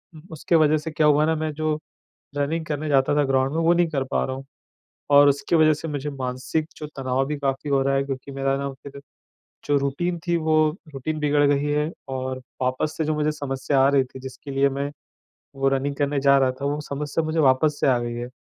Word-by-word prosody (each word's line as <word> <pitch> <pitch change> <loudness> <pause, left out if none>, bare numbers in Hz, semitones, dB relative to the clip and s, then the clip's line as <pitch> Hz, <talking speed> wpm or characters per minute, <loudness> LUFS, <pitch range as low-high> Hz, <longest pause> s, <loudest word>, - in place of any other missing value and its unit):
उम, 155 - -11
उसके 165 +3 0
वजह 155 -1 +4
से 155 +1 -5
क्या 150 0 +2
हुआ 150 +1 +4
ना, 160 0 +1
मैं 155 0 -2
जो 155 0 -1 0.6
रनिंग 160 +3 -1
करने 150 0 -3
जाता 135 0 +3
था 145 - +3
ग्राउंड 135 0 +1
में, - - +1
वो 170 +1 +5
नहीं 175 -1 +3
कर 135 -4 -1
पा - - +1
रहा 130 - -4
हूँ। 135 0 -9 0.7
और 145 0 +8
उसकी 140 +4 0
वजह 155 -1 +5
से 155 +2 -6
मुझे 145 -1 -3
मानसिक 130 +3 -3
जो 150 - -6
तनाव 130 0 0
भी 150 -1 -3
काफ़ी 135 +1 -2
हो 140 -1 +3
रहा 135 0 +1
है, 135 - +2
क्योंकि 135 0 -6
मेरा 135 0 0
ना, 140 0 -3
फिर 140 0 -9 0.7
जो 145 -1 +2
रूटीन 170 +6 -1
थी, 170 - +2
वो 155 -1 +3 0.2
रूटीन 155 +4 -3
बिगड़ 145 -1 +2
गयी 140 +1 0
है 150 +2 0 0.2
और 130 0 -3 0.2
वापस 130 +4 -1
से 160 - 0
जो 155 - 0
मुझे 150 0 +1
समस्या 140 -1 -1
आ 135 - +5
रही 140 -1 +3
थी, 130 +1 -12
जिसके 130 +2 -9
लिए 135 +1 +3
मैं 140 +1 -3 0.7
वो 135 0 +2
रनिंग 135 +1 0
करने 145 -1 0
जा 140 0 +5
रहा 130 -1 +3
था, - - -3
वो 145 +1 -1
समस्या 150 +2 -3
मुझे 155 +1 -2
वापस 145 +2 +3
से - - +2
आ 125 -2 +4
गयी 120 0 -4
है। 120 0 -5
145 Hz, 235 wpm, -23 LUFS, 135-155 Hz, 0.7 s, और